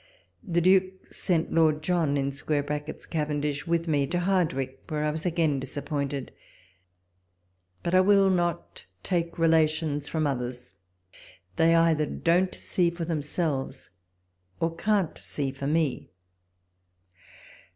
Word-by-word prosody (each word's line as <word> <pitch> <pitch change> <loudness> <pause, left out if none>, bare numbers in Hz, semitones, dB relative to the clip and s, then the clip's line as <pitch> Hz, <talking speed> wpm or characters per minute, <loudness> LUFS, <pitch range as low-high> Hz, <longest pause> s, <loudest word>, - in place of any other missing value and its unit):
The 175 -6 0
Duke 185 +1 +2
sent 170 -4 -1
Lord 155 -2 +3
John 165 -4 +1
[Cavendish] 145 +1 -2
with 170 0 0
me 145 -3 +1
to 175 - -1
Hardwicke, 155 -8 0
where 150 -1 -1
I 150 - +1
was 160 +3 -3
again 160 -5 +1
disappointed; 140 0 -4 1.5
but 170 - -2
I 185 - +6
will 195 0 +5
not 175 - -2 0.2
take 170 -2 -1
relations 160 -2 +2
from 160 -1 0
others; 125 -5 -4 0.8
they 165 +8 +4
either 165 -2 +3
don't 180 +2 +1
see 175 -2 +1
for 170 0 -5
themselves, 150 -4 -3 0.7
or 165 0 -1
can't 200 -1 0
see 140 -2 -2
for 135 +1 -5
me. 155 - 0
160 Hz, 115 wpm, -27 LUFS, 145-170 Hz, 1.5 s, I